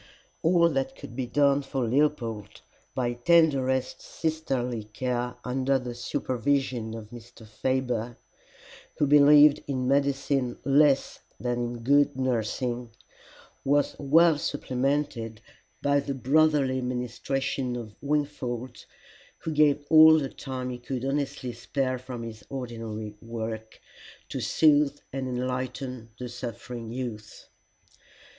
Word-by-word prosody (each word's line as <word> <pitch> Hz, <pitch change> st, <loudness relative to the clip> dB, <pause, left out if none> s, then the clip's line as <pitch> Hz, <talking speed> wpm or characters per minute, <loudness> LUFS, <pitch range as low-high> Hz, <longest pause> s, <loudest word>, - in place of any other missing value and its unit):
All 170 Hz, 0 st, +4 dB
that 135 Hz, -3 st, -2 dB
could 115 Hz, -, -10 dB
be 130 Hz, -1 st, -2 dB
done 140 Hz, +2 st, +3 dB
for 135 Hz, -3 st, -2 dB
Leopold 115 Hz, -, -1 dB, 0.3 s
by 120 Hz, -2 st, 0 dB
tenderest 130 Hz, -2 st, +2 dB
sisterly 130 Hz, -8 st, -2 dB
care 125 Hz, +2 st, -3 dB
under 130 Hz, +2 st, +1 dB
the 125 Hz, -2 st, -5 dB
supervision 120 Hz, -1 st, -1 dB
of 110 Hz, -2 st, -9 dB
Mr. 120 Hz, -1 st, -12 dB
Faber, 120 Hz, 0 st, -2 dB, 0.8 s
who 150 Hz, -, +3 dB
believed 145 Hz, +1 st, +7 dB
in 130 Hz, -3 st, -1 dB
medicine 135 Hz, -2 st, +1 dB
less 140 Hz, 0 st, +3 dB, 0.2 s
than 120 Hz, 0 st, -1 dB
in 120 Hz, 0 st, -3 dB
good 145 Hz, +2 st, +3 dB
nursing, 125 Hz, -1 st, -1 dB, 0.7 s
was 145 Hz, +1 st, +2 dB
well 155 Hz, +2 st, +4 dB
supplemented 130 Hz, -5 st, -2 dB, 0.4 s
by 140 Hz, 0 st, +3 dB
the 140 Hz, 0 st, -3 dB
brotherly 135 Hz, -1 st, +2 dB
ministrations 125 Hz, +1 st, -2 dB
of 110 Hz, -3 st, -8 dB
Wingfold, 130 Hz, -4 st, -3 dB, 0.6 s
who 160 Hz, -, -3 dB
gave 145 Hz, -1 st, +3 dB
all 160 Hz, 0 st, +8 dB
the 140 Hz, -3 st, -1 dB
time 130 Hz, -2 st, -5 dB
he 125 Hz, -, -6 dB
could 130 Hz, +1 st, -4 dB
honestly 135 Hz, -2 st, -2 dB
spare 130 Hz, +2 st, -2 dB
from 125 Hz, -2 st, -7 dB
his 110 Hz, -2 st, -8 dB
ordinary 115 Hz, -5 st, -5 dB
work 110 Hz, -1 st, -6 dB, 0.5 s
to -, -, -4 dB
soothe 145 Hz, -2 st, +3 dB
and 135 Hz, -1 st, -3 dB
enlighten 125 Hz, -1 st, -4 dB
the 125 Hz, -, -5 dB
suffering 120 Hz, -1 st, -7 dB
youth. 115 Hz, -4 st, -7 dB
130 Hz, 115 wpm, -27 LUFS, 120-140 Hz, 0.8 s, all